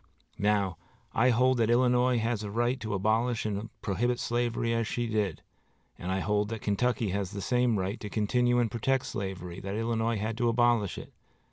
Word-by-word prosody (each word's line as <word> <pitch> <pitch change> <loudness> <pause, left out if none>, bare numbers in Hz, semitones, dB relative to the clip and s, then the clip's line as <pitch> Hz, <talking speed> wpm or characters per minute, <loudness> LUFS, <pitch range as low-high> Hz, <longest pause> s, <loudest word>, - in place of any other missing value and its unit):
Now, 100 -4 +1 0.4
I 125 +3 +4
hold 125 +2 +3
that 115 -1 +2
Illinois 125 +1 +3
had 115 -1 0
a 105 - -5
right 120 +4 0
to 110 -3 -3
abolish 110 +4 +1
and 105 +1 -3
prohibit 120 +5 0
slavery 120 -1 0
as 115 -1 0
she 120 0 -1
did, 105 -7 -1 0.5
and 90 - -5
I 95 0 0
hold 105 +1 0
that 115 -2 -5
Kentucky 110 0 0
has 100 -1 -2
the 100 0 -6
same 125 +3 +2
right 95 +3 -2
to 105 - -6
continue 120 +4 +2
and 120 -3 +1
protect 130 +4 0
slavery 95 -3 -5
that 100 +1 -5
Illinois 115 0 0
had 110 +3 -3
to 120 -1 +3
abolish 120 -4 +2
it. - - -9
115 Hz, 190 wpm, -29 LUFS, 100-120 Hz, 0.5 s, I